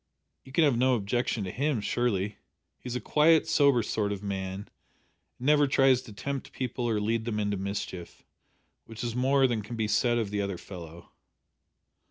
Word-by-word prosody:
You 130 - -14
can 160 +4 +3
have 135 -6 +3
no 130 0 +4
objection 115 +1 -1
to 95 - -4
him 140 +1 0
surely. 105 -2 -1 0.4
He's 125 -1 -6
a - - 0
quiet, 160 +3 +4
sober 140 -6 +4
sort 105 -1 -1
of 100 0 -5
man, 95 0 -4 0.7
and 125 - -8
never 145 0 +5
tries 135 -2 +4
to 130 - -12
tempt 135 +7 -5
people 125 -1 -3
or 110 -2 +1
lead 110 +2 -1
them 110 -3 -2
into 105 -1 0
mischief 95 -2 -5 0.6
which 115 0 -8
is 120 -1 -3
more 135 +2 +3
than 120 -4 0
can 105 +3 -7
be 110 -1 -1
said 120 +3 +2
of 110 -4 -2
the 105 -1 -1
other 100 -2 -3
fellow." 85 -3 -11
115 Hz, 185 wpm, -28 LUFS, 100-130 Hz, 0.7 s, never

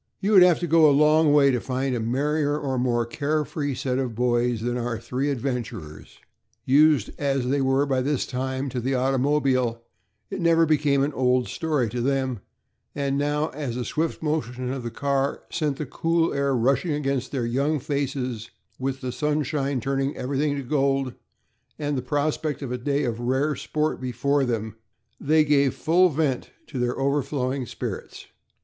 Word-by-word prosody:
You 200 - 0
would 195 -3 +8
have 180 -1 +7
had - - -11
to 175 - -1
go 160 -1 +6
a - - +4
long 150 +2 +4
way 140 -2 +5
to 125 - 0
find 130 0 -2
a - - -1
merrier 145 +5 0
or 135 -4 -2
more 120 -2 +1
care 150 +5 -1
free 145 -3 -3
set 130 0 -1
of 125 -4 -3
boys 120 -1 +1
than 120 +1 -1
our 120 -1 -2
three 130 +5 -2
adventurers. 120 - -5 0.5
Used 150 +2 +4
as 135 -3 0
they 140 +1 +1
were, 135 +1 +2
by 135 -2 0
this 140 0 0
time, 130 +1 -3
to 125 - -3
the 130 +3 0
automobile, 130 -2 +1 0.5
it 195 -1 -4
never 165 -1 +4
became 145 -3 +2
an 145 +1 -1
old 125 -1 +2
story 155 -7 0
to 120 +3 -3
them, 130 -2 0 0.6
and 140 -1 -1
now, 145 +2 0
as 135 -5 -5
the 125 -1 -3
swift 160 +1 -2
motion 130 -5 -2
of 135 - -4
the 120 - -4
car 140 +2 -1
sent 150 -4 -1
the 150 - -3
cool 165 +4 0
air 140 -1 +1
rushing 135 +7 +1
against 135 -3 -2
their 130 -4 -1
young 140 +6 0
faces, 135 -5 -3 0.3
with 135 0 -3
the 130 -1 -3
sunshine 145 -1 -1
turning 135 +3 -1
everything 140 +3 -1
to 140 - -4
gold, 135 -1 0 0.6
and 145 -1 -2
with 130 -3 -2
the - - -22
prospect 150 0 -1
of 130 - -5
a 125 - -1
day 140 +3 0
of 120 -3 -2
rare 130 +5 0
sport 155 +3 -2
before 135 +3 0
them, 110 -3 -3 0.4
they 155 +2 +3
gave 140 -2 +3
full 180 +3 +3
vent 145 -4 -1 0.2
to 135 - -6
their 125 0 -1
overflowing 135 -2 -1
spirits. - - -6
135 Hz, 180 wpm, -24 LUFS, 125-150 Hz, 0.6 s, would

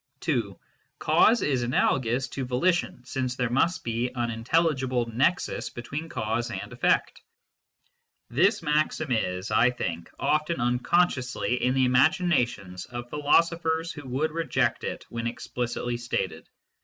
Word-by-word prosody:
(2) - - -1 0.4
^Cause 235 +2 +4
is 135 -4 +1
analogous 125 +1 +1
to 135 - -4
volition, 130 +6 0
since 130 -1 -2
there 125 -2 -1
must 165 +6 +1
be 120 +2 -1
an 120 -1 -1
intelligible 130 0 +1
nexus 125 +10 0
between 145 +7 -6
cause 115 +3 -2
and 120 - -6
effect, - - +1
j - - -34 1.1
This - - +3
maxim 150 -1 0
is, 95 -4 -1
I 125 - +5
think, 85 -9 -4
often 155 +2 0
unconsciously 125 0 +1
in 125 +1 +2
the 130 -1 +3
imagina 155 +2 +3
tions 90 -5 -9
of 120 -1 -7
philosophers 165 +2 +2
who 145 -3 -9
would 140 +5 -1
reject 165 +1 0
it - - -5
when 115 0 -3
explicitly 120 0 -3
stated. 95 -9 -3
125 Hz, 135 wpm, -26 LUFS, 120-155 Hz, 1.1 s, I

